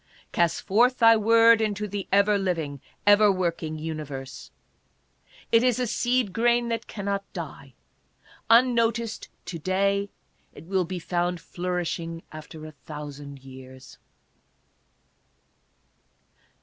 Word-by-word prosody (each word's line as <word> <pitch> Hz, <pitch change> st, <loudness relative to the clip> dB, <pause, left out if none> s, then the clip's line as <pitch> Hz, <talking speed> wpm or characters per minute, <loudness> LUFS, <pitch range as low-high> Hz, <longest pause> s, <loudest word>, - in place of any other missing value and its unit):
" -, -, -26 dB
Cast 170 Hz, -1 st, +1 dB
forth 240 Hz, +6 st, +3 dB
thy 230 Hz, -1 st, +7 dB
word 230 Hz, +1 st, +5 dB
into 210 Hz, -1 st, -1 dB
the 200 Hz, -1 st, -5 dB
ever 200 Hz, +1 st, +4 dB
living, 160 Hz, -7 st, -2 dB, 0.2 s
ever 205 Hz, 0 st, +6 dB
working 170 Hz, -4 st, -2 dB
uni 155 Hz, 0 st, -4 dB
verse; 135 Hz, -2 st, -8 dB, 1.0 s
it 230 Hz, -, +5 dB
is 250 Hz, -2 st, +2 dB
a 250 Hz, -, 0 dB
seed 240 Hz, -2 st, 0 dB
grain 235 Hz, +1 st, +2 dB
that 230 Hz, 0 st, -3 dB
cannot 200 Hz, -1 st, -4 dB
die; -, -, -8 dB, 0.7 s
unnoticed 230 Hz, -1 st, +2 dB, 0.2 s
to 170 Hz, -, -6 dB
day, 200 Hz, +3 st, 0 dB, 0.5 s
it -, -, -11 dB
will 185 Hz, 0 st, 0 dB
be 185 Hz, +2 st, -5 dB
found 175 Hz, 0 st, -2 dB
flourishing 170 Hz, -2 st, -4 dB
afte. 155 Hz, 0 st, -9 dB
a -, -, -10 dB
thousand 145 Hz, -1 st, -9 dB
years." 130 Hz, 0 st, -13 dB
190 Hz, 120 wpm, -25 LUFS, 160-225 Hz, 1.0 s, thy